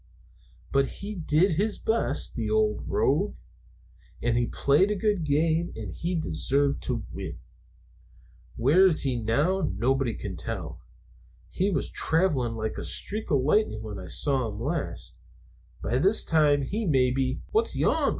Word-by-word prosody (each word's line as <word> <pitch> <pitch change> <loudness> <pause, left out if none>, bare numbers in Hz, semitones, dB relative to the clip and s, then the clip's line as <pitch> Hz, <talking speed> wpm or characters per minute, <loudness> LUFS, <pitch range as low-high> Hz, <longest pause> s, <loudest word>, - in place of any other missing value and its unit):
But 135 0 +3 0.2
he 210 +1 -4
did 170 +1 +2
his 210 +2 +1
best, 225 +1 0
the 110 -3 -3
old 110 -1 +1
rogue; - - +1 0.8
he 120 0 +1
played 145 +8 +2
a 210 - 0
good 205 -3 0
game, 160 +3 +1
and 105 -5 -6
he 175 +2 -3
deserved 140 - 0
to 120 -4 -2
win. - - -6 1.2
Where 150 +11 +5
he 145 -7 +1
is 120 - -4
now 155 - +1
nobody 130 +1 +1
can 95 -4 -6
tell. - - -5 0.7
He 190 +2 0
was 195 - -1
traveling 150 -9 +1
like 110 -1 -3
a - - -4
streak 215 +2 -2
of 140 -3 +3
lightning 150 - +1
when 105 -2 -6
I 90 - -9
last - - 0
saw 135 -5 +1
him. 140 +10 -2 0.9
By 120 +5 0
this 195 +8 +3
time 150 -3 +3
he 210 +12 -2
may 130 -5 +3
be 130 0 -1
" - - -27
"What's 445 +1 +1
yon?" - - +2
140 Hz, 155 wpm, -27 LUFS, 120-180 Hz, 1.2 s, Where